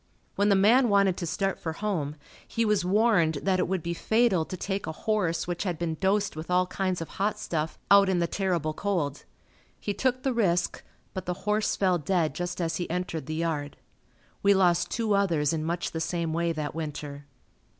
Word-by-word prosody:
When 205 +1 +2
the 200 - +5
man 230 +6 +5
wanted 200 -2 +4
to 170 - -3
start 195 +4 -1
for 160 - -4
home, 165 -6 -2 0.3
he 230 - 0
was 210 -3 +2
warned 185 -4 +3
that 185 -1 +2
it 180 - +1
would 185 -2 -2
be 170 - -2
fatal 220 -3 +2
to 185 - -6
take 195 +2 -3
a - - -2
horse 180 -2 -1
which 175 -1 -3
had 180 -4 -2
been 170 -1 -2
dosed 200 0 +1
with 155 +2 -7
all 180 0 +3
kinds 185 -1 -2
of 165 - -4
hot 210 +2 -1
stuff 160 -6 -3
out 200 -1 +7
in 190 - +2
the 170 - +2
terrible 170 -4 -1
cold. 160 -6 -2 0.5
He 205 - -2
took 255 +4 0
the 265 - +1
risk 180 -7 +1 0.3
but 185 -1 -5
the 180 +1 -4
horse 210 +1 +1
fell 185 -3 +2
dead 165 0 0
just 175 0 -4
as 165 -2 -1
he 175 - -4
entered 175 -2 -3
the 155 - -3
yard. 155 -3 -2 0.6
We 200 0 +5
lost 180 -3 +3
two 225 -3 0
others 170 -7 +2
in 155 -1 -1
much 170 0 -2
the 160 - -3
same 165 -1 -1
way 170 +1 +1
that 155 -2 -3
winter. 145 -2 -6
180 Hz, 205 wpm, -27 LUFS, 165-200 Hz, 0.6 s, out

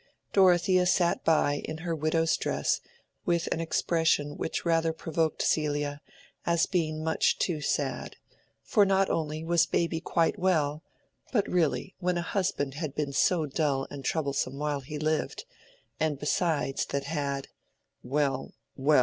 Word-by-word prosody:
Dorothea 185 -1 +4
sat 175 -1 +2
by 145 -3 +2
in 155 - -5
her 170 - 0
widow's 160 +1 +1
dress, - - 0 0.4
with 170 -1 +1
an - - -3
expression 160 -3 +1
which - - -3
rather 165 -1 +2
provoked 160 0 -1
Celia, 145 -1 0 0.4
as 170 -1 +2
being 155 -4 -1
much 160 0 +2
too 160 -5 -1
sad; 140 -3 -2 0.5
for 205 - +4
not 195 0 +3
only 155 0 -2
was 170 0 +3
baby 170 -1 0
quite 170 +4 +1
well, 155 -5 +1 0.5
but 210 -6 +1
really 180 +2 0
when 180 -1 0
a 175 - -1
husband 175 -7 -1
had 150 -1 -5
been 145 -2 -2
so 160 +3 +3
dull 140 -2 0
and 140 -1 -7
troublesome 140 -2 -1
while 145 -1 -1
he 150 +3 -7
lived, 155 - -1 0.5
and 155 -2 0
besides 150 -1 0
that 140 0 -2
had—well, 140 -1 -4 0.2
well! 145 +1 +4
155 Hz, 140 wpm, -28 LUFS, 145-170 Hz, 0.5 s, Dorothea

